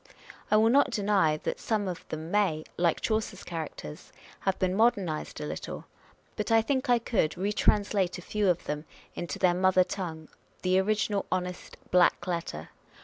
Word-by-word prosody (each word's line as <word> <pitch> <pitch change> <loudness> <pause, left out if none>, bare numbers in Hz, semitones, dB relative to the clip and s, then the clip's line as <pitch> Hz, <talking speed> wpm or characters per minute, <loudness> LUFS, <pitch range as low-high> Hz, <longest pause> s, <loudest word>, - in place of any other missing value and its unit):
I 215 - +5
will 225 +2 +5
not 280 +2 +5
deny 200 -9 +2
that - - -2
some 210 -3 -1
of 180 -2 -6
them 160 +2 -5
may, 190 -7 +2
like 170 -2 +1
Chaucer's 215 -3 -1
characters, 155 - -7 0.3
have 195 - 0
been 185 -1 +1
modernised 195 -7 +1
a 150 - -4
little; - - -6 0.5
but - - -3
I 225 - +6
think 260 +1 -1
I 245 - +6
could 215 -8 0
retranslate 200 -1 +1
a 180 - -9
few 210 -1 0
of 175 -1 +1
them 150 +1 -4 0.3
into 170 -4 -5
their 180 -2 +3
mother 185 0 +4
tongue, 165 -5 -5 0.4
the 185 0 +3
original 205 0 0
honest 180 -1 -3
black 180 -1 +4
letter. 170 - -4
185 Hz, 165 wpm, -28 LUFS, 170-210 Hz, 0.5 s, I